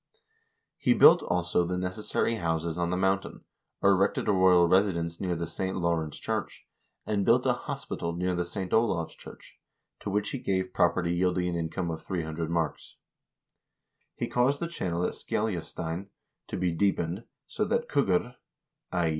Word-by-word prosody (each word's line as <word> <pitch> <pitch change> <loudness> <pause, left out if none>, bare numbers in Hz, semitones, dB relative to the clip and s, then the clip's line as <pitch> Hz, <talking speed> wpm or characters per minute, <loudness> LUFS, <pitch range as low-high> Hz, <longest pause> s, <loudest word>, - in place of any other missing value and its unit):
He 245 - +3
built, 170 -5 +8
also, 90 0 +1
the 90 +1 -2
necessary 105 +5 -1
houses 80 -2 -1
on 85 0 -1
the 90 - 0
mountain, 95 +1 0 0.4
erected 100 0 +3
a - - +4
royal 95 -2 +5
residence 85 -3 +1
near 90 -2 0
the 85 0 -3
St. 95 +3 -3
Law 85 -2 +1
rence 80 -2 -4
church, - - -4 0.4
and 105 -2 0
built - - +4
a - - +4
hospital 85 - -4
near 90 +2 -1
the 90 0 0
St. 90 +1 -5
Olav's 105 -8 +1
church, - - -14 0.4
to - - -5
which 105 +1 0
he 135 - -3
gave 95 -6 -1
property 85 0 +2
yielding 90 0 +1
an 85 - -2
income 85 +1 -2
of 80 -1 -6
300 80 -2 -3
marks. 85 -3 -2 1.2
He - - -2
caused 130 +4 +2
the 170 - -2
channel 90 - -2
at - - -1
Skeljastein 90 -3 -3 0.4
to - - -4
be 90 -1 +1
deepened, 90 +2 0 0.2
so - - -2
that - - 0
kuggr 105 +7 +1 0.5
(i. 85 -3 +1
90 Hz, 165 wpm, -28 LUFS, 85-95 Hz, 1.2 s, built